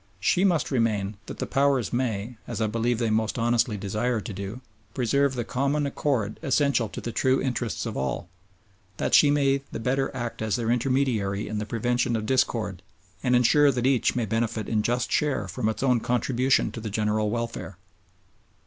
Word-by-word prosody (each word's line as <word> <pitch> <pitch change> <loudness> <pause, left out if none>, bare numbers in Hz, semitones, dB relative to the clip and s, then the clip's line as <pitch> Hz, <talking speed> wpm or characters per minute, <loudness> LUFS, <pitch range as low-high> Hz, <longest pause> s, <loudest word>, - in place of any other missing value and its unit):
She 180 - +2
must 175 -7 +2
remain 110 -5 0
that - - -7
the - - -2
Powers 135 -4 +1
may, 120 -2 -2
as 115 -3 -4
I 110 - +2
believe 115 +2 0
they 115 -2 0
most 110 +1 0
honestly 115 -2 +1
desire 105 +4 -1
to 105 - -6
do, 100 +5 -6 0.3
preserve 135 +2 +1
the 120 - -1
common 140 +4 0
accord 130 -7 -1
essential 140 -5 +1
to - - -7
the 120 - -4
true 130 +3 +2
interests 125 -4 -2
of - - -4
all; 65 +5 -2 0.7
that - - -2
she 145 - +7
may 140 -1 +2
the - - -4
better 135 +4 0
act 120 -2 -4
as 110 -2 0
their 115 -1 0
intermediary 120 -6 0
in 105 -1 -3
the 105 - -4
prevention 120 +2 0
of 110 -1 -2
discord 110 -5 0 0.4
and 125 0 +2
ensure 140 +4 +5
that 125 -2 -2
each 130 -2 +2
may 120 -2 0
benefit 110 0 -1
in 110 -2 +1
just 120 +3 -1
share 140 -9 0
from 95 +4 -1
its 110 +3 -3
own 125 -3 +3
contribution 125 +2 +1
to 115 - -7
the 110 - -4
general 105 0 0
welfare. 115 -4 -4
120 Hz, 185 wpm, -26 LUFS, 110-130 Hz, 0.7 s, she